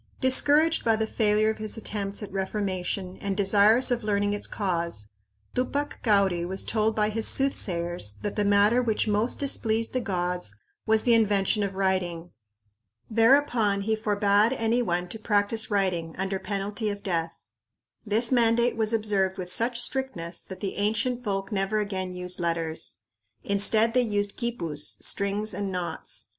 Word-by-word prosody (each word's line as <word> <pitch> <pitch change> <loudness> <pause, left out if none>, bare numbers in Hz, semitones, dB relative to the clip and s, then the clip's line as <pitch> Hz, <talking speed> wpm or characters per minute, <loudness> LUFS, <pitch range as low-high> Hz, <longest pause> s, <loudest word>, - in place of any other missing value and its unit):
Discouraged 295 +5 +4
by 225 -1 +3
the 220 0 -1
failure 215 -1 +2
of 220 - -8
his 215 +1 -4
attempts 205 -1 -4
at 205 - -8
reformation 190 -1 -3
and 200 -1 -4
desirous 210 +5 +4
of 240 -2 0
learning 205 -1 0
its 205 - -2
cause, 170 - -3 0.4
Tupac 280 +3 -2
Cauri 195 -6 +2
was 190 +2 -3
told 220 0 0
by 210 -1 +1
his 220 +1 -2
soothsayers 175 - 0
that 205 - -3
the 210 - +1
matter 205 +4 +4
which 225 -2 0
most 215 +3 +1
displeased 230 -5 0
the 255 - +1
gods 180 - -3 0.3
was 220 0 +3
the 240 - +4
invention 210 -1 +2
of 200 -1 -2
writing. 180 -3 -1 0.8
Thereupon 230 -3 +3
he 220 +2 0
forbade 210 +1 +2
anybody 225 -7 0
to 200 +5 -7
practice 215 +1 0
writing, 185 -6 -1
under 190 +1 -2
penalty 205 +2 -3
of 200 0 -6
death. 165 -3 -2 0.7
This 225 +3 +3
mandate 235 -1 +3
was 220 0 +1
observed 200 -4 +1
with 180 -1 -4
such 235 +4 +1
strictness 235 -10 -1
that 185 -1 -10
the 195 - -4
ancient 225 +4 -1
folk 195 -2 -3
never 195 +1 0
again 190 -3 -3
used 180 0 -1
letters. 165 -2 0 0.4
Instead, 215 +3 +3
they 250 - +4
used 205 -3 -1
quipus, 170 - -2
strings 200 +2 -1
and 200 -1 -3
knots. 180 -2 -5
205 Hz, 155 wpm, -26 LUFS, 190-225 Hz, 0.8 s, Discouraged